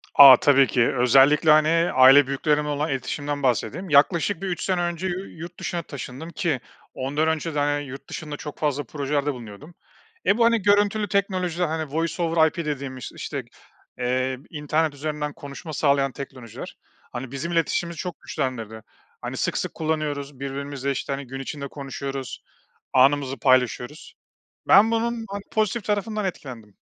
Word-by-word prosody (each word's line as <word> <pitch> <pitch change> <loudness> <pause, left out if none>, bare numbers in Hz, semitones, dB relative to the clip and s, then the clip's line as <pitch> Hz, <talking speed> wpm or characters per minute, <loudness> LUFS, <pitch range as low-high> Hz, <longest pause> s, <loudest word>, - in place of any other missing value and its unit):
A, 135 -3 +11
tabii 140 -2 +4
ki. 120 -1 +2
Özellikle, 135 +5 +5
hani, 160 +3 +4
aile 130 +2 +7
büyüklerimle 150 +2 0
olan 150 +2 -1
iletişimimden 145 +2 -3
bahsedeyim. 140 - -1
Yaklaşık 165 +5 +3
bir 195 - -3
3 175 - -3
sene 185 -2 0
önce 175 +1 -2
yu 185 +1 -3
yurt 170 +1 -9
dışına 175 - -3
taşındım 140 +1 -8
ki 170 -7 -1 0.3
ondan 145 +4 -1
önce 160 0 -1
de 145 - +1
hani, 145 0 0
yurt 135 +1 -10
dışında 150 -2 -6
çok 150 0 -8
fazla 145 -1 0
projelerde 145 +2 -2
bulunuyordum. 120 +6 -11 0.5
E, 200 - +3
bu 235 - +3
hani 230 -2 +3
görüntülü 205 +1 +2
teknolojiler, 185 -3 0
hani, 155 -2 -3
Voice 165 +1 -1
over 165 -1 +4
IP - - -5
dediğimiz 135 -4 -5
işte - - -4
g - - -24 0.5
eee, 130 +1 0
internet 155 0 -1
üzerinden 150 0 -4
konuşma 145 +4 -9
sağlayan 140 -2 +2
teknolojiler. 130 -4 -9 0.3
Hani, 125 +1 -6
bizim 140 +5 -4
iletişimimizi 170 0 0
çok 180 -2 -6
güçlendirdi. 115 -4 -4 0.4
Hani, - - -5
sık - - -1
sık - - -3
kullanıyoruz 145 -3 -3
birbirimizle, 140 0 -4
işte, 135 - -3
hani, 135 -1 -6
gün 135 +1 -7
içinde 140 +1 -5
konuşuyoruz, 135 -2 -6 0.5
anımızı 135 +1 +3
paylaşıyoruz. 130 +2 +1 0.5
Ben 205 +4 +7
bunun, 230 0 -1
hani, 200 0 -5
pozitif 215 0 0
tarafından 210 0 -1
etkilendim. 120 - -7
145 Hz, 160 wpm, -24 LUFS, 135-170 Hz, 0.5 s, A